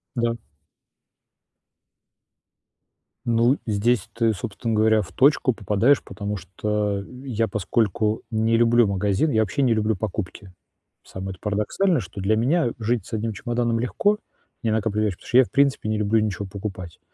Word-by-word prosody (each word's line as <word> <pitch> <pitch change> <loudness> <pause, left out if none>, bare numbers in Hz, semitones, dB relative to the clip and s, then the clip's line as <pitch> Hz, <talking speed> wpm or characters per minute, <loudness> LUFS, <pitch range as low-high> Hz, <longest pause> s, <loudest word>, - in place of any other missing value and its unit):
Да. 120 -1 +1 2.9
Ну, 120 +3 +3
здесь 110 0 +1
ты, 115 -1 +2
собственно 110 +3 -4
говоря, 110 0 +4
в 90 - -7
точку 135 -1 +3
попадаешь, 110 +5 +2
потому 105 0 -5
что 100 +2 -2 0.2
я 115 -4 0
поскольку 110 +1 0
не 110 +1 +2
люблю 120 0 +4
магазины, 100 +8 +1
я 110 -1 +3
вообще 140 +6 -1
не 125 -4 +3
люблю 110 0 +1
покупки. 95 -1 -5 0.5
Самое-то 95 -1 -7
парадоксальное, 110 - 0
что 100 -1 -8
для 100 +3 +2
меня 130 +3 +2
жить 110 -2 -1
с - - -13
1 110 0 -2
чемоданом 120 +2 -1
легко, 205 - +1 0.5
не 110 - +1
накапливаешь, 110 -2 0
потому - - -16
что 125 - +1
я, 130 - +7
в - - -15
принципе, 140 -5 +2
не 110 0 0
люблю 105 +1 +2
ничего 100 -2 -2
покупать. 95 -4 -7
110 Hz, 145 wpm, -23 LUFS, 105-120 Hz, 2.9 s, я